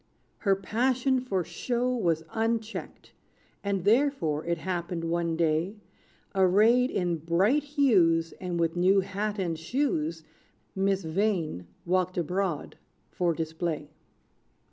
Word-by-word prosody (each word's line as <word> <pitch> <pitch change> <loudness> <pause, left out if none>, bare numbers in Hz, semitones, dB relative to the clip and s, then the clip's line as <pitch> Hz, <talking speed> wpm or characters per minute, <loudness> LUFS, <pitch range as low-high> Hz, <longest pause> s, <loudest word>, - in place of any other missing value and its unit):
Her 195 -3 +3
passion 255 +6 +1
for 195 -8 -1
show 250 +7 -1
was 170 -8 0
unchecked; 225 0 -3 0.5
And 200 -3 -1
therefore, 205 - +2
it 170 0 0
happened 175 -1 -3
one 170 0 0
day, 165 +4 +1 0.6
Arrayed 210 +7 +4
in 175 -7 0
bright 180 - +2
hues, 200 - +3
And 180 -2 -3
with 165 0 +1
new 190 +3 +4
hat 205 +2 -3
and 170 -4 -2
shoes, 165 - -1 0.5
Miss 195 0 +1
Vain 160 - -1 0.2
walked 185 +1 0
abroad 180 -1 -2 0.3
for 175 -2 0
display. 160 -2 -3
185 Hz, 115 wpm, -28 LUFS, 165-220 Hz, 0.6 s, Arrayed